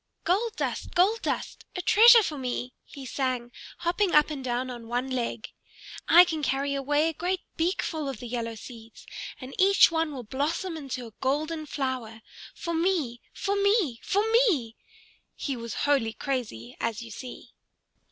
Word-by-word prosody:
"Gold 430 +5 +1
dust, - - -3
gold 400 +6 +3
dust, - - -3
a 360 - -2
treasure 460 +4 +8
for 310 - -3
me!" 250 -1 -4
he 275 -2 -10
sang, 255 -2 -2 0.3
hopping 355 +2 0
up 300 +1 +5
and 280 -3 -5
down 250 +1 -2
on 235 -2 -9
one 245 +3 -2
leg. 235 -3 -3 0.6
"I 350 +2 +9
can 320 -3 -3
carry 280 0 0
away 290 +3 +1
a 325 - -1
great 360 +4 -2
beakful 325 -3 -1
of 265 - -5
the - - -8
yellow 230 -1 -3
seeds, 225 0 -12 0.3
and 260 +1 -9
each 390 -2 +6
one 325 -1 0
will 260 -4 -6
blossom 300 - -2
into 270 -5 -5
a 225 - -12
golden 305 +4 -1
flower 255 -6 -4 0.3
for 340 - -4
me 325 -8 0
for 400 0 -2
me 400 - +2
for 405 +2 +1
me!" 350 - +3 0.6
He 275 - -3
was 235 -1 -6
wholly 270 -6 +2
crazy, 225 - -4
as 230 0 -2
you 230 - -10
see. 250 +3 -9
275 Hz, 165 wpm, -27 LUFS, 245-340 Hz, 0.6 s, I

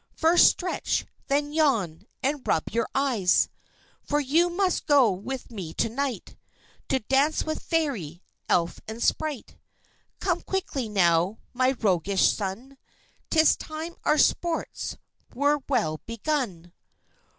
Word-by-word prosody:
First 330 +2 +6
stretch, 360 0 0 0.2
then 290 +1 0
yawn, 220 - +1 0.2
and 280 +1 0
rub 160 - 0
your 230 0 -1
eyes. 240 -10 +2 0.5
For 295 - 0
you 315 +5 +2
must 365 +1 0
go 275 -7 +5
with 240 +8 -6
me 185 -8 -7
to - - +1
night 270 +2 -4 0.5
To 265 - +1
dance 270 +7 +2
with 315 0 -3
Fairy, 225 - -2 0.3
Elf, 170 0 +1
and 220 +2 -5
Sprite. 305 -6 -1 0.6
Come 355 -2 0
quickly 280 - -3
now, 180 0 +2 0.2
my 255 +1 +2
roguish 195 -4 +2
son, 230 +7 -6 0.5
'Tis 315 -1 +5
time 315 +2 -6
our 300 - +3
sports 335 +1 0 0.4
were 290 +3 +2
well 180 - 0
begun. 230 - -3
265 Hz, 125 wpm, -26 LUFS, 200-300 Hz, 0.6 s, First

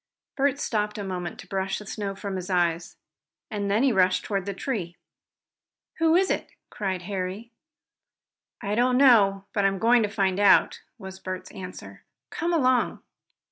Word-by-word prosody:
Bert 280 -1 +1
stopped 210 -5 -2
a 205 - -4
moment 180 -2 -5
to 180 - -15
brush 195 0 -2
the 210 - -9
snow 200 -1 -4
from 200 -1 -5
his 185 0 -5
eyes, 175 -2 0 0.5
and 205 -2 -2
then 210 +5 +2
he 275 - +4
rushed 185 -3 +2
toward 195 -2 -2
the 200 - -2
tree. 185 -8 -4 1.0
"Who 325 0 +4
is 380 +1 +3
it?" - - -3 0.2
cried 190 -3 -3
Harry. 195 +4 -5 1.1
"I 200 0 -2
don't 250 +3 +2
know 205 -8 +5
but 200 - +1
I'm 195 0 +2
going 235 +3 +4
to 210 - 0
find 195 -2 0
out," 205 -1 +4 0.2
was 190 0 -9
Bert's 185 -1 -6
answer. 185 -1 -10 0.3
"Come 340 +1 -2
along!" 255 -6 +1
200 Hz, 165 wpm, -26 LUFS, 190-230 Hz, 1.1 s, know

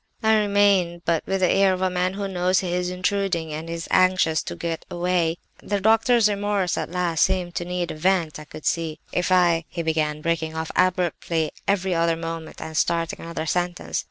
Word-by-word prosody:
I 220 0 +5
remained, 200 -5 +2
but 165 -2 +1
with 195 0 -1
the 185 - +4
air 195 -1 +4
of 185 0 -2
a 185 - +2
man 180 +1 0
who 200 0 -3
knows 185 0 +1
he 180 -2 -3
is 180 0 -1
intruding 180 -3 -1
and 160 +2 -6
is 165 0 -5
anxious 185 -4 +3
to - - -6
get 165 -1 -4
away. 175 -1 0 0.2
The 205 -1 -1
doctor's 225 +2 +4
remorse 205 -3 0
at - - -3
last 175 -2 -1
seemed 185 -2 +1
to 175 - -2
need 180 -1 -2
a - - -5
vent, 170 -1 0
I 155 - -10
could 155 - -11
see. 160 -2 -1
"'If 180 +1 -1
I—' 175 -3 +4
he 170 - -4
began, 155 -2 -1
breaking 160 -1 -1
off 160 0 -3
abruptly 175 -3 +1 0.2
every 190 -2 +1
other 165 0 +2
moment, 165 -1 -6
and 160 - -7
starting 165 +1 0
another 165 -1 -5
sentence. 175 +2 -2
175 Hz, 200 wpm, -23 LUFS, 165-190 Hz, 0.2 s, I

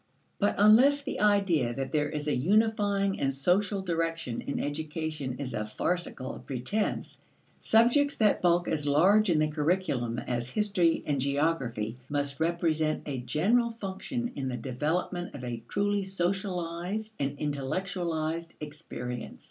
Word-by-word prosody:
But 205 - +2
unless 250 +8 +6
the 280 - -4
idea 195 - +2
that 135 -1 -3
there 150 -2 +1
is 150 0 -4
a 150 - +2
unifying 200 - +2
and 135 - +1
social 190 +8 +1
direction 165 -8 -2
in 140 - -3
education 150 -2 -3
is 130 -3 -5
a 105 -1 -2
farcical 165 0 -2
pretense, 140 - -2 0.4
subjects 245 +6 +4
that 215 -3 +3
bulk 175 0 +3
as 150 -1 0
large 190 +9 +5
in 165 - +3
the 155 0 +3
curriculum 150 -6 0
as 120 0 -3
history 185 -2 +2
and 140 -3 0
geography, 135 -6 0
must 140 -1 -2
represent 160 -2 +1
a 140 -3 -3
general 215 - +2
function 230 +3 -4
in 135 - -3
the 125 -1 -2
development 155 +9 -2
of 130 - -8
a 120 -2 -4
truly 205 0 0
socialized 190 +2 -2
and 140 0 -1
intellectualized 160 +3 -2
experience. 145 -5 -7
165 Hz, 140 wpm, -29 LUFS, 140-195 Hz, 0.4 s, unless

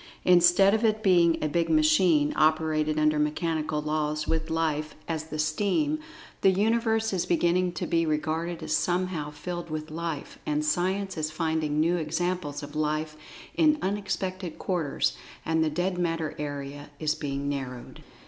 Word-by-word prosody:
Instead 180 +2 +6
of 220 +1 +1
it 215 -1 +1
being 175 -4 +4
a - - +2
big 165 +2 0
machine, 155 -1 +4
operated 155 0 +2
under 155 0 +3
mechanical 155 0 -1
laws, 150 0 -1
with 160 0 -1
Life 155 -2 -1
as 160 -1 -3
the 155 -1 -6
steam, 205 - 0 0.4
the 195 - +6
Universe 220 +2 +1
is 180 - -1
beginning 175 +1 +2
to - - -3
be 165 0 +1
regarded 160 +2 -2
as - - 0
somehow 175 -4 -1
filled 170 +3 -6
with 155 0 -5
Life, 165 -2 -5
and 150 0 -1
Science 185 +4 0
is 155 -1 -1
finding 155 -2 -1
new 170 +3 +2
examples 165 -2 -2
of 145 +1 -9
Life 155 0 -1 0.4
in 310 -2 +4
unexpected 190 -3 -3
quarters, 170 -7 -1 0.3
and 160 0 +2
the 160 - +1
"dead 180 +4 -1
matter" 165 -2 -1
area 145 0 -5
is 155 0 0
being 140 -2 -4
narrowed. 130 -3 -5
160 Hz, 155 wpm, -27 LUFS, 155-180 Hz, 0.4 s, Instead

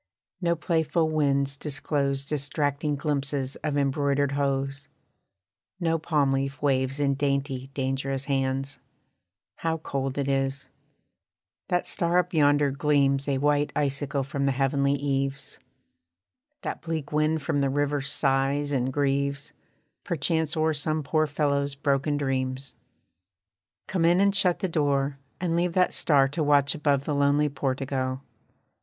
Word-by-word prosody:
No 170 -1 +2
playful 160 -1 0
winds 140 -3 +1
disclose 140 -1 -1
Distracting 145 0 -1
glimpses 140 -2 -2
of 145 -1 -2
embroidered 140 0 +1
hose: 140 0 -1 0.9
No 165 -2 +1
palm 150 -4 +1
leaf 135 +1 -1
waves 135 -1 0
in 140 -1 +2
dainty, 140 -1 -1
dangerous 135 0 -2
hands. 135 -1 -1 0.8
How 165 0 -1
cold 135 -3 -3
it 140 -1 -1
is! 135 0 -1 1.0
That 180 0 +1
star 170 +1 +1
up 180 +1 +1
yonder 145 -2 +4
gleams 140 -1 +2
A 140 -1 +1
white 145 +1 +1
ice 140 -2 0
sickle 140 -1 -2
from 140 +1 -2
the 135 - +2
heavenly 140 +1 +1
eaves. 135 -1 -2 1.0
That - - -4
bleak 160 -4 -4
wind 155 0 +1
from 145 -1 0
the 140 - +2
river 145 +1 0
sighs 140 +1 0
and 130 -2 0
grieves, 140 0 -1 0.5
Perchance 160 -2 0
o'er 160 0 +2
some 155 +1 -2
poor 155 +2 +1
fellow's 140 -1 0
broken 145 +1 0
dreams. 130 -1 -2 1.1
Come 180 -3 0
in, 175 +2 +4
and 200 0 +4
shut 185 -3 +2
the 190 - +1
door, 140 -4 0 0.2
and 170 -2 0
leave 175 0 +1
that 180 0 +2
star 140 -3 +4
To 155 +4 -3
watch 145 -1 +3
above 140 -2 +1
the 150 - -2
lonely 145 +1 +3
portico. 130 -1 -2
140 Hz, 135 wpm, -26 LUFS, 135-150 Hz, 1.1 s, yonder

